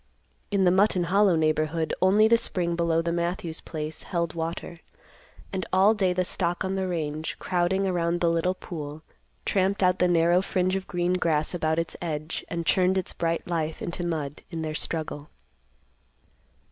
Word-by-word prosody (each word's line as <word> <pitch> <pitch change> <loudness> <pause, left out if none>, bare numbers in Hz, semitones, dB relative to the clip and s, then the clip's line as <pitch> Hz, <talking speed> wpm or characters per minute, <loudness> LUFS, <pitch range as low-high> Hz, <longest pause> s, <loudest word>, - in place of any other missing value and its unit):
In 200 -2 +2
the 180 - +5
Mutton 190 -1 +3
Hollow 195 +1 +4
neighborhood, 155 0 +1
only 200 +4 +5
the 230 - +6
spring 170 -5 -1
below 165 -1 +1
the 170 - -1
Matthews 170 -1 -2
place 155 -1 -5
held 170 -3 -2
water; 165 +1 -4 0.7
and 190 -1 -1
all 195 +3 +5
day 195 -4 +1
the 180 0 0
stock 175 0 -1
on 190 - -1
the 190 -1 -1
range, 155 -3 -3
crowding 185 +2 0
around 175 -2 0
the 170 - +2
little 170 +2 +1
pool, 155 -4 -7 0.4
tramped 195 0 +1
out 180 0 +3
the 180 - +4
narrow 175 +1 +4
fringe 185 -1 0
of 190 0 -4
green 175 0 0
grass 160 -4 +1
about 160 -2 0
its 165 0 -1
edge, 155 -2 -3
and 170 0 -3
churned 185 +2 +3
its 185 - -2
bright 165 0 -1
life 160 -2 -2
into 175 +1 -4
mud 155 -4 -3
in 165 -2 -4
their 155 -1 -3
struggle. 155 -2 -3
170 Hz, 170 wpm, -26 LUFS, 160-185 Hz, 0.7 s, the